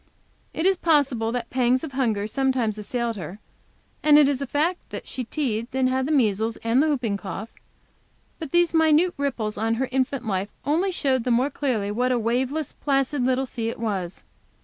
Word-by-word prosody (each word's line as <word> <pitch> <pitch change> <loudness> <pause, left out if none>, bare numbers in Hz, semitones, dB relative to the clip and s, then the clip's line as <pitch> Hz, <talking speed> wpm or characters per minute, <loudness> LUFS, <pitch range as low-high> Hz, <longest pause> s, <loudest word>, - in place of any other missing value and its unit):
It 320 - -3
is 385 -1 +4
possible 275 -9 +2
that 235 -1 -4
pangs 255 0 +2
of 315 - -5
hunger 230 -6 0
sometimes 250 -3 0
assailed 235 +1 -2
her, 180 +2 -7 0.6
and 300 -1 +6
it 295 -2 +6
is 280 -1 0
a 275 - -3
fact 320 +7 0
that - - -7
she 255 - -4
teethed, 235 -3 -3
had 260 +1 0
the - - -1
measles 225 -5 +1
and 230 +4 +3
the 315 - +2
whooping 245 -9 0
cough. 200 +3 -7 0.9
But 315 -5 -6
these 345 -1 +3
minute 320 +2 +4
ripples 240 -7 -2
on 225 +1 +1
her 260 +3 -1
infant 260 -1 -1
life 195 -1 -1 0.2
only 340 +7 +1
showed 265 -8 0
the 250 - -2
more 250 +4 +2
clearly 230 -9 -1
what 250 +4 0
a 250 - +2
waveless, 255 +6 -1
placid 275 -1 0
little 260 +1 +1
sea 230 -3 -3
it - - -6
was. 195 -6 -3
255 Hz, 190 wpm, -24 LUFS, 225-285 Hz, 0.9 s, and